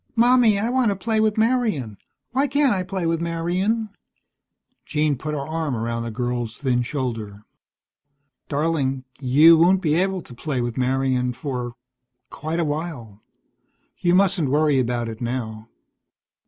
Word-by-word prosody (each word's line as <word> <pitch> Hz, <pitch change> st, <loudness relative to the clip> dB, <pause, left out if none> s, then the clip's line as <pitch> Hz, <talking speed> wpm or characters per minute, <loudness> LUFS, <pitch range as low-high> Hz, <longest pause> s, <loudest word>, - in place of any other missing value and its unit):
"Mommy, 240 Hz, -2 st, +5 dB
I 220 Hz, +4 st, -1 dB
want 255 Hz, -3 st, +2 dB
to 200 Hz, -, 0 dB
play 220 Hz, +3 st, -1 dB
with 215 Hz, -1 st, +2 dB
Marian. 220 Hz, -, +1 dB, 0.4 s
Why 270 Hz, +4 st, +1 dB
can't 280 Hz, -2 st, +2 dB
I 190 Hz, -, -1 dB
play 185 Hz, -1 st, -3 dB
with 165 Hz, 0 st, 0 dB
Marian?" 180 Hz, +7 st, -1 dB, 0.9 s
Jean 150 Hz, -1 st, 0 dB
put 150 Hz, +4 st, -4 dB
her 140 Hz, -1 st, -4 dB
arm 160 Hz, -4 st, -2 dB
around 115 Hz, +1 st, -2 dB
the 115 Hz, -, -4 dB
girl's 120 Hz, -1 st, -3 dB
thin 125 Hz, -3 st, 0 dB
shoulder. 115 Hz, -6 st, -4 dB, 1.1 s
"Darling, 140 Hz, -3 st, 0 dB, 0.2 s
you 150 Hz, +5 st, +6 dB
won't 185 Hz, +3 st, +5 dB
be 155 Hz, -5 st, 0 dB
able 185 Hz, +1 st, 0 dB
to -, -, -13 dB
play 130 Hz, +2 st, -3 dB
with 120 Hz, -1 st, -2 dB
Marian 130 Hz, -1 st, 0 dB
for 125 Hz, -4 st, -5 dB, 0.6 s
quite 160 Hz, +3 st, -4 dB
a 170 Hz, -, +1 dB
while. 145 Hz, -9 st, -5 dB, 0.8 s
You 175 Hz, 0 st, +3 dB
mustn't 185 Hz, -6 st, +2 dB
worry 150 Hz, -1 st, +3 dB
about 120 Hz, -1 st, -1 dB
it 110 Hz, 0 st, -7 dB
now." 115 Hz, -2 st, -4 dB
150 Hz, 150 wpm, -23 LUFS, 125-185 Hz, 1.1 s, you